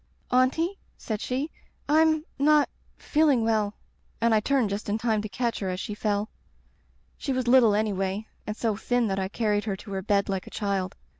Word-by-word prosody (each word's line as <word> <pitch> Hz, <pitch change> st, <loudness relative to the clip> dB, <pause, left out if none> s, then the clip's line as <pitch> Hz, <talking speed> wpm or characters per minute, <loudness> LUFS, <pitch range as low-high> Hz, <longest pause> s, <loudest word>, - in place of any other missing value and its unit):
"* -, -, -30 dB
Auntie/ 325 Hz, +9 st, 0 dB, 0.2 s
said 215 Hz, -2 st, -4 dB
she, 270 Hz, +5 st, -2 dB, 0.4 s
Tm 315 Hz, +1 st, +4 dB
— -, -, -38 dB
not 300 Hz, -1 st, +5 dB, 0.2 s
— -, -, -36 dB
^feeling 295 Hz, -6 st, +4 dB
well/ 215 Hz, -2 st, +1 dB, 0.2 s
— -, -, -38 dB
^and 230 Hz, 0 st, +3 dB
I 215 Hz, -, +5 dB
turned 245 Hz, -2 st, +1 dB
just 205 Hz, +1 st, -3 dB
in 210 Hz, -, +1 dB
time 220 Hz, -2 st, +1 dB
to 215 Hz, -, -5 dB
catch 235 Hz, +4 st, -1 dB
her 195 Hz, -, -2 dB
as 185 Hz, 0 st, -3 dB
she 210 Hz, -, -4 dB
fell. 210 Hz, 0 st, -1 dB, 0.9 s
She 280 Hz, -, -2 dB
was 255 Hz, -2 st, -1 dB
little 240 Hz, -4 st, +6 dB
anyway, 200 Hz, -1 st, -1 dB, 0.2 s
and 210 Hz, +1 st, -4 dB
so 225 Hz, -3 st, 0 dB
thin 245 Hz, +3 st, 0 dB
that 195 Hz, 0 st, -1 dB
I 190 Hz, -, -1 dB
carried 210 Hz, 0 st, 0 dB
her 200 Hz, -3 st, -1 dB
to 200 Hz, +2 st, -11 dB
her 190 Hz, -1 st, -2 dB
bed 200 Hz, 0 st, +1 dB
like 195 Hz, -2 st, -3 dB
a -, -, -7 dB
child. 195 Hz, -3 st, -2 dB
215 Hz, 215 wpm, -26 LUFS, 200-255 Hz, 0.9 s, little